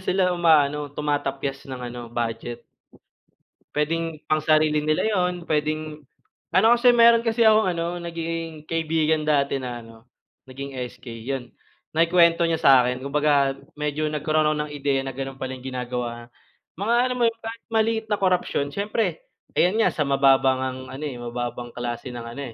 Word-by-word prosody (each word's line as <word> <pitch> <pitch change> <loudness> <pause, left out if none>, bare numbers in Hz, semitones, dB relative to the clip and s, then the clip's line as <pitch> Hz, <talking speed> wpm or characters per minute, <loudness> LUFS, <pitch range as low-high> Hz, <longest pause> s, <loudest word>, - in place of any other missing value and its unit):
sila 185 -1 +1
umaano 150 -4 +3
tumatapyas 140 -1 -3
ng 130 -1 -6
ano 120 0 -6
budget. 120 0 -4 1.1
Pwedeng 160 +1 -1
pangsarili 155 0 +3
nila 155 0 +1
yun 180 -3 0
pwedeng 155 0 -2 0.5
ano 220 - +6
kasi 245 0 +5
meron 235 0 +6
kasi 225 +1 +2
akong 220 -2 +5
ano 170 +1 -3
naging 165 -2 -5
kaibigan 160 -1 0
dati 140 -2 +2
na 120 -2 -6
ano 115 +1 -16 0.4
naging 140 +2 -7 0.2
SK 125 - -18 0.2
yun 130 -3 -4 0.4
naikwento 170 +1 +4
niya 165 - +1
sakin 125 -1 +4
kumbaga 140 -1 +2 0.2
medyo 150 +1 -2
nagkaroon 155 +1 +1 0.2
ng 150 - -11
ideya 140 -2 0
na 135 - -4
ganon 135 +1 -6
pala 130 -1 -5
yung 130 +1 -10
ginagawa 120 -2 -5 0.5
mga 220 +4 +1 0.2
ano - - +1
mo - - +2
yung 230 0 -3
kahit 225 +1 -7
maliit 225 0 +1
na 210 - +1
korapsyon 180 -6 +1
syempre 215 - -2 0.3
ayan 180 +4 +3
nga - - +3
sa 150 -2 -1
mababang 135 -1 +4
ngang 130 0 -3 0.2
ano 145 - -7
eh 145 -4 -4
mababang 120 0 -5
klase 120 +1 -4
ng 120 -1 -6
ano 115 +4 -7
150 Hz, 155 wpm, -24 LUFS, 135-170 Hz, 1.1 s, ano